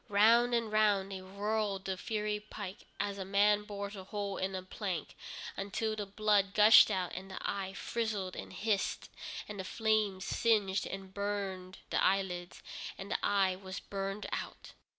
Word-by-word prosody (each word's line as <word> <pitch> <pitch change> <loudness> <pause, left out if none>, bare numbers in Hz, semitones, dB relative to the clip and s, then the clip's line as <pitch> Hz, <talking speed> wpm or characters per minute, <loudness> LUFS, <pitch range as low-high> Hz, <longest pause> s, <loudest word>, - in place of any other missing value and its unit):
Round 230 +4 +5
and 230 -2 0
round 205 -2 +3
they 190 -1 -5
whirled 200 +1 -2
the 190 - -1
fiery 210 +2 -2
pike, 205 -2 -8
as 200 -1 -2
a - - -2
man 205 +2 +3
bores 200 0 -5
a 190 -1 -8
hole 200 -1 -3
in 190 0 -2
a 185 - -4
plank, 185 -3 -4 0.4
until 215 +2 -2
the 205 -2 -4
blood 205 -1 +2
gushed 215 +1 +9
out, 185 -4 -1
and 190 +1 -6
the 190 - -7
eye 195 -1 -2
frizzled 210 -6 -2
and - - -7
hissed, 210 -2 -1 0.4
and 210 -1 -7
the - - -2
flames 215 -2 +1
singed 210 -4 +2
and 195 -1 -7
burned 195 -2 -3
the - - +2
eyelids, 180 -2 0 0.3
and 195 - -7
the - - -1
eye 195 -2 +3
was 190 0 -7
burned 195 +1 -4
out. - - -5
200 Hz, 170 wpm, -33 LUFS, 190-210 Hz, 0.4 s, gushed